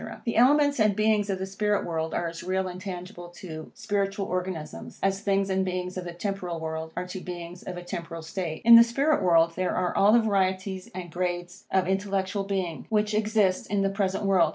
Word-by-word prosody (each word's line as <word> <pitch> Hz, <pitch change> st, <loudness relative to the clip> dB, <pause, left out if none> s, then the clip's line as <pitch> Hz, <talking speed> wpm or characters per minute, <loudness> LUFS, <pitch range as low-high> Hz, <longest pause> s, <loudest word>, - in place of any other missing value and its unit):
The 230 Hz, -, -1 dB
elements 285 Hz, +3 st, +4 dB
and 215 Hz, -2 st, +4 dB
beings 215 Hz, -1 st, +2 dB
in 195 Hz, -, 0 dB
the 190 Hz, -, -3 dB
spirit 205 Hz, +1 st, 0 dB
world 160 Hz, -1 st, -2 dB
are 175 Hz, -, 0 dB
as 165 Hz, 0 st, -6 dB
real 185 Hz, +1 st, -1 dB
and 180 Hz, 0 st, -7 dB
tangible 180 Hz, -2 st, -7 dB
to 160 Hz, -4 st, -8 dB
spiritual 195 Hz, -1 st, -1 dB
organs, 180 Hz, -4 st, -3 dB, 0.3 s
as 195 Hz, 0 st, +1 dB
things 195 Hz, -1 st, +1 dB
and 190 Hz, 0 st, +2 dB
beings 180 Hz, 0 st, -3 dB
of 185 Hz, -1 st, -4 dB
the 175 Hz, -, -5 dB
temporal 180 Hz, -2 st, -3 dB
world 160 Hz, 0 st, -4 dB
are 180 Hz, -, -2 dB
to 180 Hz, +1 st, -6 dB
beings 175 Hz, -1 st, -7 dB
of 180 Hz, -, -6 dB
a 175 Hz, -, -7 dB
temporal 165 Hz, -1 st, -6 dB
state. 160 Hz, -1 st, -4 dB
In 235 Hz, -, +9 dB
this 230 Hz, 0 st, +9 dB
spirit 280 Hz, +4 st, +2 dB
world 170 Hz, -2 st, +4 dB
there 185 Hz, -1 st, -1 dB
are 180 Hz, -1 st, 0 dB
all 200 Hz, +2 st, +5 dB
the 235 Hz, -, +6 dB
varieties 190 Hz, -3 st, 0 dB
and 175 Hz, -2 st, -6 dB
grades 175 Hz, +2 st, -3 dB
of 190 Hz, -1 st, +2 dB
intellectual 195 Hz, 0 st, -1 dB
being, 190 Hz, -5 st, -3 dB
which 210 Hz, -1 st, +1 dB
exist 210 Hz, -3 st, +1 dB
in 200 Hz, 0 st, +1 dB
the 195 Hz, -, +1 dB
present 195 Hz, 0 st, -1 dB
world. 185 Hz, -5 st, +4 dB
190 Hz, 210 wpm, -27 LUFS, 175-200 Hz, 0.3 s, In